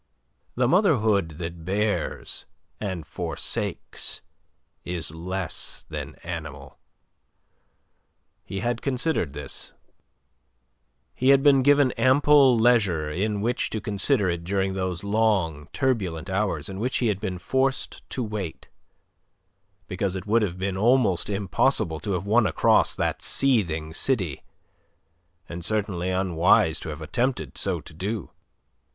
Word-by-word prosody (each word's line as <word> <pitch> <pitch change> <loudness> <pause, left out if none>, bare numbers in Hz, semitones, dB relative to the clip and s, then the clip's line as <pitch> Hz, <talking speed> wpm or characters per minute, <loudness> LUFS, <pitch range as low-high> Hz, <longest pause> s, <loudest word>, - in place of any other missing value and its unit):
The 125 0 +2
motherhood 110 - +2
that 85 -1 -6
bears 100 +4 -2 0.3
and 95 -6 -4
forsakes 80 +2 -3 0.6
is 85 -3 -2
less 90 +2 -4
than - - -6
animal. 75 -6 -7 1.6
He 95 - -5
had 120 0 -1
considered 130 - 0
this; 75 -1 -3 1.4
he 130 - +1
had 135 0 +6
been 140 -2 +6
given 145 -1 +4
ample 135 -1 +5
leisure 100 -10 +3
in 100 +4 -1
which 120 +3 0
to 110 - -3
consider 105 +2 +1
it 85 -1 -2
during 95 +1 0
those 95 -2 -3
long, 100 -8 +1
turbulent 95 - -1
hours 95 -6 -1
in 95 0 -6
which 125 +4 0
he 125 - 0
had 105 -4 +1
been 95 -4 -3
forced 130 +9 -1
to 130 - -3
wait, 105 -6 -5 1.2
because 95 0 -2
it 95 - -5
would 115 +2 +3
have 90 -4 -2
been 95 0 -2
almost 110 -4 +2
impossible 100 - +1
to 100 +1 -3
have 90 +1 -2
won 110 +1 +3
across 80 - +3
that - - -1
seething 85 - +2
city, 90 - -1 1.1
and 85 0 -7
certainly 100 -3 -1
unwise 90 -3 +3
to - - -7
have 75 +1 -6
attempted 120 - -1
so - - -1
to - - -12
do. 100 +4 -4
100 Hz, 125 wpm, -25 LUFS, 85-120 Hz, 1.6 s, had